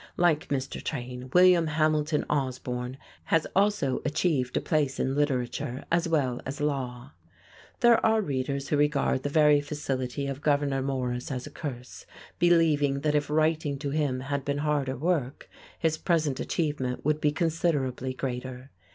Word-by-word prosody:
Like 170 -2 +2
Mr. 135 -1 -3
Train, 125 -2 -5
William 180 -2 +6
Hamilton 155 -1 +1
Osborne 130 -2 -2 0.3
has 165 -1 +2
also 195 -9 +2
achieved 150 -4 0
a - - +3
place 150 -5 0
in 135 - 0
Literature 130 -3 -1
as 170 +1 +2
well 135 -7 0
as 140 +3 -6
Law. 130 -5 -3
[Illustration: 85 0 -35 0.5
ARTHUR - - -40
TRAIN] 240 - +6
There 230 - +4
are 220 0 +3
readers 140 -3 -2
who 150 - +2
regard 145 -2 +2
the 145 - -2
very 150 -1 +5
facility 140 -2 -3
of 140 0 -4
Gouverneur 145 -2 +1
Morris 125 -2 -2
as 125 -2 -4
a - - -9
curse, 125 -5 -7 0.3
believing 155 -5 +3
that 150 0 +1
if 145 -1 0
writing 155 -1 +1
to 140 0 -4
him 140 -4 0
had 140 +1 -3
been 140 +1 -1
harder 140 -3 0
work, 150 -3 -1 0.3
his 160 -1 0
present 155 -6 +1
achievement 145 -7 -2
would 150 0 +1
be 150 - +3
considerably 145 -6 -1
greater. 130 0 -5
145 Hz, 160 wpm, -27 LUFS, 130-155 Hz, 0.5 s, William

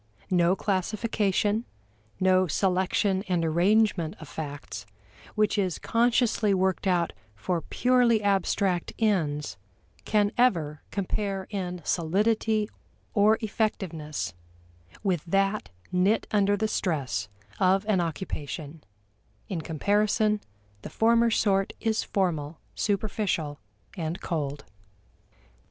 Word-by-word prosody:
No 175 0 +4
classification, 205 +2 0 0.6
no 185 0 +4
selection 190 +3 +1
and 175 -3 +1
arrangement 175 0 +2
of 155 - -10
facts, 145 -9 -7 0.5
which 210 0 +2
is 185 -4 0
consciously 230 -3 +2
worked 190 0 0
out 175 -2 +1 0.2
for 165 - -2
purely 245 -1 +2
abstract 195 -2 +1
ends, 150 - 0 0.5
can 210 -1 +2
ever 160 -12 +2
compare 195 0 -2
in 180 -3 -3
solidity 210 +5 +1 0.5
or 215 +1 +5
effectiveness 190 - -2 0.7
with 180 -6 0
that 195 +4 +1 0.2
knit 190 +4 +2
under 205 -1 +3
the 220 +2 0
stress 130 - -1 0.3
of 190 +1 +3
an 205 -4 +2
occupation; 155 -2 -5 0.7
in 175 -4 -2
comparison 210 +6 +1 0.4
the - - -7
former 230 +1 +3
sort 195 -3 +2
is 220 -1 0
formal, 165 -6 -1 0.2
superficial, 200 -7 -1 0.4
and 170 0 -3
cold. 145 -6 -3
190 Hz, 100 wpm, -27 LUFS, 165-210 Hz, 0.7 s, or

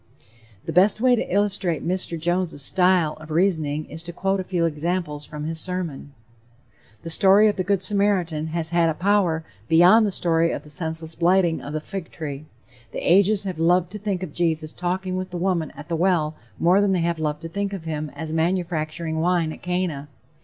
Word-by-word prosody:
The 165 - -4
best 195 +5 +4
way 250 +1 +4
to - - -3
illustrate 195 -5 +1
Mr. 180 -2 -1
Jones' 175 -1 -1
style 180 +1 +2
of 155 - -11
reasoning 155 -3 0
is 160 +2 -8
to 175 +1 -6
quote 195 +3 -1
a - - -2
few 180 -2 0
examples 155 -1 -2
from 150 0 -7
his 160 +1 -3
sermon: 165 -6 -3 0.9
"The 165 - -5
story 195 +5 +6
of 210 - +1
the 185 - -1
Good 195 0 0
Samaritan 185 -6 0
has 160 0 -2
had 170 -1 +3
a 160 - -1
power 185 -4 +1 0.2
beyond 180 +7 +6
the - - -1
story 165 -2 +1
of - - -4
the 150 - -14
senseless 160 +1 -2
blighting 175 -1 +2
of 145 - -7
the 155 - -1
fig 185 +2 -7
tree; 150 -1 -7 0.4
the - - -1
ages 200 +1 +3
have 185 -5 -5
loved 175 +1 +2
to 210 - -7
think 195 -3 -2
of 160 -5 -7
Jesus 160 -2 -1
talking 185 +1 -2
with 185 0 -4
the 180 - -5
woman 175 -4 0
at 145 - -9
the 170 - -2
well 165 -3 +1 0.2
more 180 +4 +4
than 200 -1 +2
they 180 - +1
have 170 -1 -1
loved 150 0 -2
to - - -4
think 200 +3 -3
of 190 -5 -6
him 155 -1 -3
as 160 -1 -5
manufacturing 165 -1 -1
wine 170 -2 +1
at - - -13
Cana. 180 -5 -2
170 Hz, 205 wpm, -23 LUFS, 160-185 Hz, 0.9 s, story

